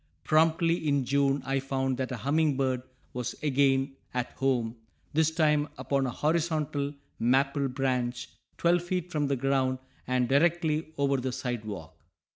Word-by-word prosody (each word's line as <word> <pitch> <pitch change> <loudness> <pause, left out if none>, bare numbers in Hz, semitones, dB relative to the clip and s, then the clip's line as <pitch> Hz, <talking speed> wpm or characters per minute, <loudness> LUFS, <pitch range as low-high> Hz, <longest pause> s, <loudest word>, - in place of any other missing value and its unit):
Promptly 165 +1 +3
in 140 -2 +2
June 140 +1 +2
I 135 0 +1
found 135 -1 -1
that 130 0 -2
a 125 - -3
humming 145 +4 +1
bird 130 -2 0 0.3
was 125 -2 -3
again 135 -1 +2 0.2
"at 125 -1 -1
home," 125 -4 0 0.4
this 160 +1 +3
time 155 -2 +2
upon 135 -1 0
a - - -1
horizontal 150 -1 0 0.2
maple 135 +3 +2
branch, 125 -2 -1 0.3
twelve 175 +1 +3
feet 180 0 -3
from 150 -3 0
the 140 - +1
ground 130 0 +1 0.3
and 125 -1 +1
directly 160 +2 +2
over 140 -1 +2
the 130 0 -2
sidewalk. 105 - -5
135 Hz, 145 wpm, -29 LUFS, 130-155 Hz, 0.4 s, Promptly